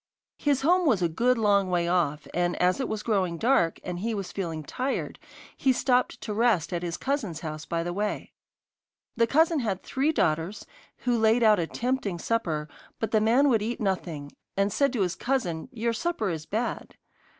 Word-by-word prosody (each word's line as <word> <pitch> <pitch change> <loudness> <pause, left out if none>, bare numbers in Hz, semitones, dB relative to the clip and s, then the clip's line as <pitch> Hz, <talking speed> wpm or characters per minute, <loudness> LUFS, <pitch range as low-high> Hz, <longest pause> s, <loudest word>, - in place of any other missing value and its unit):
His 285 -2 +1
home 355 +3 +4
was 210 -10 +3
a - - +4
good 235 +10 +2
long 200 -3 +3
way 175 -1 +1
off, 165 -4 0
and 175 0 +1
as 180 +7 +2
it 265 - -2
was 215 -1 -3
growing 190 -6 0
dark, 220 -7 +2
and 175 -1 -4
he 225 +3 -2
was 195 -3 -4
feeling 165 -5 -4
tired, 260 - -3 0.4
he 270 - +2
stopped 250 0 +1
to 215 - -4
rest 205 -7 +2
at 170 - -1
his 175 -1 -3
cousin's 220 - -2
house 155 -1 -6
by 165 0 -1
the 175 +1 -3
way. 210 +2 -3 0.8
The 230 -1 +3
cousin 320 +4 +3
had 200 -7 -2
three 275 +4 0
daughters, 165 - 0 0.4
who 245 -1 +3
laid 225 +2 +4
out 215 -3 +5
a 165 - -1
tempting 245 -6 -2
supper, 165 -7 -1 0.3
but 225 - -2
the 215 - +3
man 240 +6 +4
would 225 -5 +3
eat 230 +3 -3
nothing, 170 -8 -2 0.3
and 200 0 +1
said 280 -2 +2
to 235 - 0
his 180 -1 -1
cousin, 200 -10 -2
'Your 235 -1 -1
supper 285 - -1
is 155 -2 -5
bad. 225 +4 -3
210 Hz, 195 wpm, -27 LUFS, 175-245 Hz, 0.8 s, out